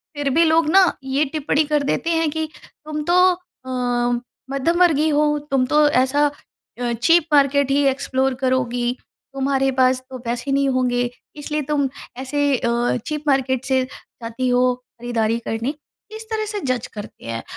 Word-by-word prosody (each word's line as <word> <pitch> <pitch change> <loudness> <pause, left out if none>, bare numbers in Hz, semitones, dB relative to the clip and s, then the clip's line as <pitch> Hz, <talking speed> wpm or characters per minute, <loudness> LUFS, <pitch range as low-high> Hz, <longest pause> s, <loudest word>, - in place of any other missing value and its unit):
फिर 290 -1 -1
भी 325 +5 +4
लोग 320 -1 +3
ना 375 +1 +5
ये 270 +3 +1
टिप्पणी 300 0 +1
कर 295 -1 +3
देते 285 +4 -1
हैं 325 -1 +1
कि 315 0 -3 0.2
तुम 305 -1 -6
तो 355 - +4 0.5
अ, 245 -1 -1 0.3
मध्यम 275 +5 0
वर्गीय 315 -3 +4
हो, 295 +1 +3 0.3
तुम 265 -2 +3
तो 300 +3 +4
ऐसा 275 +2 +2 0.6
अ, 240 -1 0
चीप 330 +6 +5
मार्केट 280 -1 +3
ही 285 +1 +3
एक्सप्लोर 265 -1 0
करोगी, 245 -2 0 0.4
तुम्हारे 270 0 +1
पास 255 0 +4
तो 260 - -7
पैसे 240 +4 -3
नहीं 275 0 +2
होंगे, 245 -2 +1 0.3
इसलिए 300 +1 -3
तुम 285 -2 +2 0.3
ऐसे 270 +3 -2
अ, 235 - -1 0.4
चीप 305 -1 -3
मार्केट 265 -2 +1
से 260 -1 +2 0.4
जाती 230 +2 -3
हो 250 0 +3
खरीदारी 240 -2 -2
करने। 230 +5 -2 0.4
इस 440 - -7
तरह 435 -1 -1
से 415 - -3
जज 255 -2 -1
करते 210 -1 -10
हैं 115 0 -4
270 Hz, 165 wpm, -21 LUFS, 250-300 Hz, 0.6 s, ना